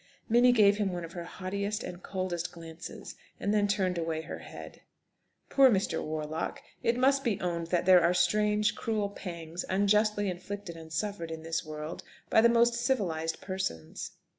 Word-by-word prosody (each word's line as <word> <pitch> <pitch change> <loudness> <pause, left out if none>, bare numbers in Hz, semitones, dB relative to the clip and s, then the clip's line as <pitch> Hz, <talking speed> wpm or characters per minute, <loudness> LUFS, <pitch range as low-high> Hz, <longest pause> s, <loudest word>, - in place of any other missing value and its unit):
Minnie 245 +2 +6
gave 205 -4 +5
him 205 -3 0
one 175 -1 -4
of 165 - -11
her 175 -1 -6
haughtiest 200 +4 -3
and 175 0 -7
coldest 185 -3 -3
glances, 165 -1 -9 0.3
and 205 - 0
then 205 -1 +3
turned 190 -4 0
away 165 -1 -2
her - - -7
head. - - -10 0.7
Poor 270 -1 +6
Mr. 200 -4 +1
Warlock! 155 +1 -3 0.2
It 235 +1 +1
must 275 +2 +3
be 225 -7 0
owned 170 -2 -2
that 175 0 +1
there 185 -1 +7
are 170 +1 +4
strange, 210 +4 +3
cruel 215 -3 -1
pangs 170 -3 -6
unjustly 205 +2 +3
inflicted 185 0 -5
and 160 -1 -11
suffered 170 0 -3
in 160 0 -6
this 165 0 -2
world 155 +1 -6 0.3
by 220 - +6
the 235 - +6
most 235 0 +4
civilised 195 -10 -1
persons. 80 - -4
185 Hz, 170 wpm, -30 LUFS, 165-210 Hz, 0.7 s, there